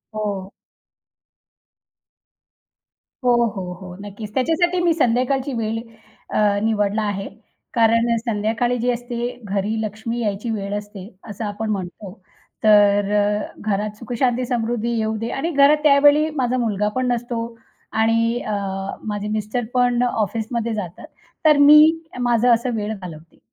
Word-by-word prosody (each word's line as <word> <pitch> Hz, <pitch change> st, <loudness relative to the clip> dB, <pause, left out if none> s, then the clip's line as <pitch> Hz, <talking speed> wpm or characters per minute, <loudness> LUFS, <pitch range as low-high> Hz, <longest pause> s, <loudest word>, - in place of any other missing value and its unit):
हो. 200 Hz, -3 st, -3 dB, 2.7 s
हो, 245 Hz, -, +4 dB, 0.2 s
हो, 180 Hz, -2 st, -5 dB
हो, 180 Hz, 0 st, -10 dB
नक्कीच. 205 Hz, +1 st, -8 dB
त्याच्यासाठी 340 Hz, +6 st, +1 dB
मी 340 Hz, -, +4 dB
संध्याकाळची 260 Hz, -1 st, +1 dB
वेळ 225 Hz, 0 st, -2 dB, 0.5 s
अ, 205 Hz, -1 st, +2 dB
निवडली 215 Hz, -1 st, +1 dB
आहे. 205 Hz, -2 st, -3 dB, 0.5 s
कारण 230 Hz, 0 st, +3 dB
संध्याकाळी 225 Hz, +2 st, -1 dB
जे 245 Hz, +1 st, +1 dB
असते, 240 Hz, 0 st, -5 dB, 0.2 s
घरी 205 Hz, +1 st, -2 dB
लक्ष्मी 220 Hz, +2 st, -4 dB
यायची 210 Hz, +2 st, -2 dB
वेळ 200 Hz, -2 st, -3 dB
असते 205 Hz, -2 st, -9 dB, 0.2 s
असं 210 Hz, +2 st, -5 dB
आपण 210 Hz, +2 st, -4 dB
म्हणतो. 190 Hz, 0 st, -5 dB, 0.5 s
तर 205 Hz, -1 st, +5 dB
अ, 205 Hz, 0 st, 0 dB, 0.2 s
घरात 210 Hz, +1 st, -1 dB
सुखशांती, 245 Hz, +1 st, -1 dB
समृद्धी 235 Hz, -1 st, -1 dB
येऊ 220 Hz, 0 st, -1 dB
दे 225 Hz, +2 st, -4 dB
आणि 320 Hz, +6 st, -2 dB
घरात 285 Hz, 0 st, +5 dB
त्यावेळी 290 Hz, +1 st, +5 dB
माझा 255 Hz, -2 st, 0 dB
मुलगा 210 Hz, -4 st, 0 dB
पण 255 Hz, -1 st, 0 dB
नसतो 240 Hz, -1 st, -2 dB, 0.6 s
आणि 230 Hz, +1 st, +2 dB
अ, 215 Hz, -, -1 dB, 0.6 s
माझे 205 Hz, 0 st, -4 dB
मिस्टर 215 Hz, +3 st, -2 dB
पण 245 Hz, -1 st, +2 dB
अ, -, -, +3 dB
ऑफिसमध्ये 225 Hz, +2 st, -2 dB
जातात. 180 Hz, -5 st, -6 dB, 0.4 s
तर 300 Hz, -1 st, +6 dB
मी 295 Hz, +1 st, +8 dB, 0.4 s
माझं 240 Hz, 0 st, +3 dB
असं 235 Hz, +1 st, 0 dB
वेळ 215 Hz, 0 st, -2 dB
घालवते. 165 Hz, -3 st, -11 dB
225 Hz, 135 wpm, -21 LUFS, 205-245 Hz, 2.7 s, मी